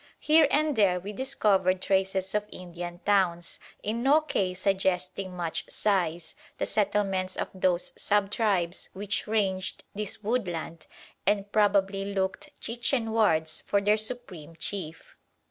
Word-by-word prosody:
Here 310 0 +5
and 300 0 +2
there 190 -5 +3
we 200 +4 -7
discovered 200 -7 +2
traces 190 0 0
of 210 0 -1
Indian 175 -1 -7
towns, 180 -4 +1 0.2
in 220 +3 -2
no 285 +5 +5
case 185 -11 -2
suggesting 185 -1 0
much 170 -2 -2
size, 175 -5 0 0.2
the - - -1
settlements 195 -3 0
of - - -2
those 185 -2 +1
sub 205 -1 +1
tribes 190 -6 0
which 205 +3 -3
ranged 195 -3 -1
this 210 +1 -4
woodland 180 -8 -2 0.4
and 200 0 +1
probably 200 -1 +2
looked 190 +9 -2
Chichen 235 0 0
wards 160 -8 +2
for 200 - +3
their 205 +1 +3
supreme 215 -8 -5
chief. 165 -3 -5
195 Hz, 130 wpm, -28 LUFS, 180-210 Hz, 0.4 s, Here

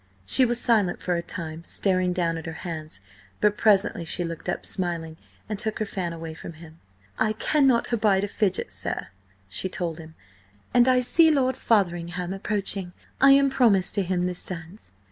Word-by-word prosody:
She 255 - +4
was 240 0 0
silent 215 -8 +2
for 180 - -1
a 170 - -1
time, 165 -1 -6
staring 185 0 0
down 170 -2 0
at 165 0 -7
her 165 - -5
hands, 155 - -2 0.4
but 210 0 +3
presently 205 -5 +2
she 170 +2 -2
looked 165 -1 -6
up - - -3
smiling, 170 -3 -2 0.3
and 210 -2 -4
took 220 0 +1
her 215 - -1
fan 185 -4 -4
away 165 -1 -7
from 165 +1 -9
him. 160 0 -14 0.4
"I 215 -1 +2
cannot 255 0 +2
abide 205 -4 +2
a - - 0
fidget, 200 -2 -1
sir!" - - -5 0.4
she 95 - -2
told 170 -3 -4
him. 160 0 -12 0.6
"And 245 0 +5
I 255 -1 +4
see 320 +6 +4
Lord 260 -4 +2
Fotheringham 175 -3 0
approaching. 195 -2 -1 0.3
I 275 0 +8
am 275 0 +4
promised 205 -8 +3
to 205 - +1
him 180 -1 -1
this 180 -1 -3
dance." 175 +3 -5
185 Hz, 185 wpm, -25 LUFS, 170-220 Hz, 0.6 s, I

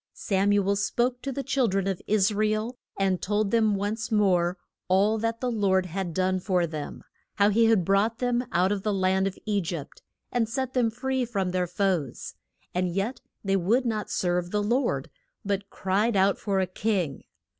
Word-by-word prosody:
Sam 200 -1 +1
u 200 -1 +2
el 200 - +3
spoke 245 +5 0
to 275 - -3
the 275 +1 -3
chil 260 -1 +1
dren 195 -1 0
of 195 -2 -2
Is 210 0 +3
ra 215 +1 +2
el 215 +3 -1 0.2
and 190 -2 +1
told 205 +1 0
them 220 -3 +3
once 210 +3 -3
more 185 -4 +2 0.3
all 200 +4 +3
that 230 +1 -2
the 250 -1 0
Lord 190 -4 +2
had 185 0 -3
done 185 0 +1
for 180 -2 +1
them, 155 -3 -6 0.3
how 200 0 +4
he 230 +3 +4
had 220 -6 +3
brought 200 +4 +2
them 245 -1 0
out 180 +3 +2
of 205 -1 -1
the 210 0 0
land 190 0 +2
of 195 - -5
E 205 -2 +1
gypt, 165 -4 -6 0.3
and 230 -3 0
set 260 +2 -2
them 245 -3 +2
free 260 +3 -1
from 200 -6 -1
their 180 -1 0
foes, 180 - -1 0.4
and 180 0 0
yet 195 +8 -2 0.2
they 195 -1 +1
would 215 +8 +2
not 215 -3 -2
serve 175 -1 0
the 210 +2 0
Lord, 240 +6 0 0.3
but 200 0 -2
cried 205 +4 0
out 195 +1 +3
for 200 -2 0
a 190 - +2
king. 185 - -2
200 Hz, 200 wpm, -26 LUFS, 185-225 Hz, 0.4 s, how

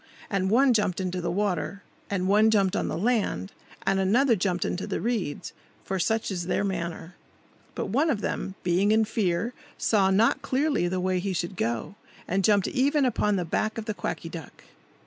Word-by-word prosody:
And 190 -1 +1
one 255 +4 +5
jumped 205 -5 +1
into 185 -1 -2
the 175 - -2
water, 200 +1 -1 0.3
and 185 -2 -1
one 210 +3 +5
jumped 200 -4 +2
on - - 0
the - - -2
land, 200 - 0 0.3
and 195 0 +2
another 230 +6 +3
jumped 180 -2 0
into 185 - -3
the - - -2
reeds; 215 -11 -2 0.3
for 190 -1 -2
such 220 +3 0
is 175 -2 -3
their 190 - +1
manner. 170 -3 -4 0.6
But - - -3
one 285 +10 +2
of 225 -8 0
them, 190 - -3
being 185 +4 +2
in 220 0 +4
fear, 210 +1 -1 0.2
saw 200 -3 +3
not 210 +5 +3
clearly 275 - +1
the 185 +1 -1
way 185 0 0
he 190 +1 -2
should 175 +2 -3
go, 115 - -2 0.3
and 195 +2 0
jumped 205 -1 +3
even 280 +2 +2
upon 210 -4 +1
the 180 -2 -1
back 215 +7 -1
of 225 - -4
the 215 - -2
Quacky 175 - -4
Duck. 165 -4 -10
195 Hz, 190 wpm, -26 LUFS, 180-220 Hz, 0.6 s, one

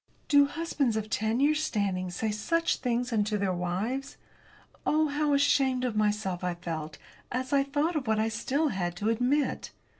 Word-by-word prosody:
Do 285 -1 +6
husbands 285 -7 -1
of 215 0 -4
ten 220 +3 0
years' 300 +2 +3
standing 190 -7 -1
say 215 +5 -2
such 330 +11 0
things 245 -1 -1
unto 210 -1 +1
their 195 -2 0
wives? 205 +11 -3 0.7
Oh, 310 0 +2
how 290 0 +1
ashamed 265 -2 +2
of 240 -3 -2
myself 210 -4 0
I 180 -1 -1
felt 160 -3 -5 0.3
as 255 +2 -2
I 280 - +5
thought 290 +5 0
of 280 -6 -2
what 220 0 +2
I 220 +1 +2
still 265 +7 0
had 175 -5 -2
to 210 +5 -1
admit! 250 +6 0
235 Hz, 175 wpm, -28 LUFS, 205-280 Hz, 0.7 s, Do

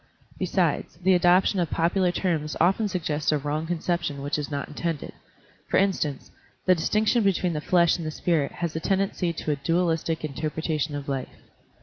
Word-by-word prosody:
Besides, - - 0
the 190 +1 +5
adoption 180 +2 +4
of 170 -3 0
popular 175 +2 +2
terms 160 -5 -1
often 190 +6 +3
suggests 155 -6 -1
a 150 - +2
wrong 150 +3 -2
conception 170 -4 -2
which 145 +1 -1
is 145 - -4
not 140 -2 -3
intended;^ 165 0 -4 0.6
for - - +2
instance, 180 -8 0 0.3
the 185 - +6
distinction 215 +7 +2
between 185 -3 +1
the 150 - -2
flesh 170 0 +3
and 165 -2 -5
the - - -1
spirit 155 -2 0
has 170 -2 -4
a - - 0
tendency 195 -1 0
to 160 -2 -3
a - - +1
dualistic 165 +1 0
interpretation 155 +1 -2
of 145 -1 -5
life. 135 -2 -4
165 Hz, 175 wpm, -26 LUFS, 150-180 Hz, 0.6 s, the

